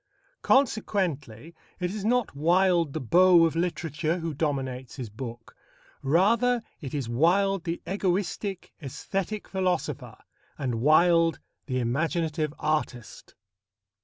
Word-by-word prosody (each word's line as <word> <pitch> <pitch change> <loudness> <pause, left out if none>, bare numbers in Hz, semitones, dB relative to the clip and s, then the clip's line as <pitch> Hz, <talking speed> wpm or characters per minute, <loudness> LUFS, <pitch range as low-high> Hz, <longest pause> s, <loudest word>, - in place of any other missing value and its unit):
Consequently, 175 - 0 0.3
it 180 -1 -2
is 210 -2 -5
not 240 -5 +1
Wilde 170 0 +2
the 160 - -2
beau 175 +5 +5
of 165 - -1
literature 165 -2 -1
who 165 -2 -4
dominates 135 -4 -3
his 125 -6 -7
book. 115 0 -8 0.5
Rather, 220 - +2 0.2
it 140 -2 -6
is 135 -5 -2
Wilde 180 +9 +2
the 170 0 -2
egoistic, 195 +1 -2
æsthetic 195 - -4
philosopher, 185 -2 -2 0.4
and 120 -5 -2
Wilde 165 +3 +4 0.3
the 130 -2 -1
imaginative 155 +5 -1
artist. 150 -6 -3
165 Hz, 110 wpm, -27 LUFS, 140-185 Hz, 0.5 s, beau